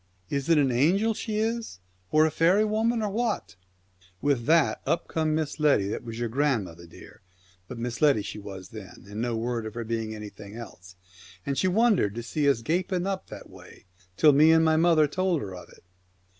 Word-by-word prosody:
" 95 - -38
Is 140 - -7
it 165 - +5
an 140 -3 +3
angel 185 - +2
she 215 0 -5
is, 225 - -2 0.3
or 155 0 +5
a 160 - 0
faery 185 +8 +3
woman, 220 +2 0
or 210 - -1
what? 220 - -2 0.3
" 90 -1 -31
With 125 -4 0
that 165 -1 +3
up 170 - -1
come 155 -1 0
Miss 155 -1 -3
Letty, 140 -10 +3
that - - -4
was 115 -1 -7
your 120 0 -2
grand 135 -1 +1
mother, 85 0 -12
dear, 85 - -15 0.5
but 125 - -8
Miss 120 +3 -5
Letty 140 -9 +4
she 105 - -7
was 95 -2 -9
then, 105 -4 -11
and 105 +2 -6
no 120 -1 -1
word 115 -1 -3
of 110 - -9
her 120 - -3
being 110 -1 -3
anything 105 -1 -10
else, 95 -5 -11 0.5
and 140 - -1
she 185 - +1
wondered 195 - +2
to 120 - -5
see 140 +4 0
us 115 -5 0
gaping 180 - -1
up 195 -1 -3
that - - -10
way, - - -16 0.3
till 150 -2 +6
me 155 +3 +6
and 160 0 +4
my 160 0 +3
mother 160 -1 +4
told 185 +2 0
her 95 -2 -7
of 90 - -11
it. - - -19
140 Hz, 215 wpm, -26 LUFS, 110-170 Hz, 0.5 s, till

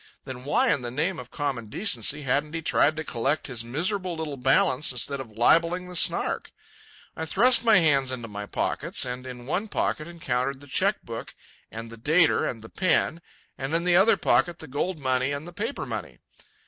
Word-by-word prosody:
Then 130 -1 -8
why 145 - +3
in 140 - -2
the 120 - -4
name 160 +8 -1
of - - -9
common 135 -7 -3
decency 145 - +1
hadn't 145 +4 0
he 160 - -4
tried 155 0 +2
to 160 - -4
collect 135 +2 -1
his 120 -4 -4
miserable 180 - -1
little 160 -3 -4
balance 135 +2 +2
instead 130 +2 -2
of 110 -5 -9
libelling 170 +8 +3
the 180 - -9
Snark? - - +1 0.6
I 160 - -3
thrust 240 +9 +4
my 225 -3 +6
hands 140 -6 +3
into 120 -3 -5
my 105 -1 -7
pockets, - - -1
and 125 +1 -5
in 125 -1 -9
one 180 - -2
pocket 155 -6 -1
encountered 135 -5 -2
the 145 - -14
cheque 130 - +1
hook - - -7 0.3
and 115 +1 -8
the 115 - -11
dater 160 +6 +3
and 115 -3 -7
the 110 - -11
pen, 170 -2 +1 0.4
and 135 +4 -2
in 170 - +1
the 180 0 +3
other 200 +3 +6
pocket 175 0 +2
the - - -10
gold 160 +6 -2
money 130 0 0
and 145 +3 -5
the 175 - -10
paper 225 +9 -3
money. - - -6
145 Hz, 200 wpm, -26 LUFS, 125-170 Hz, 0.6 s, my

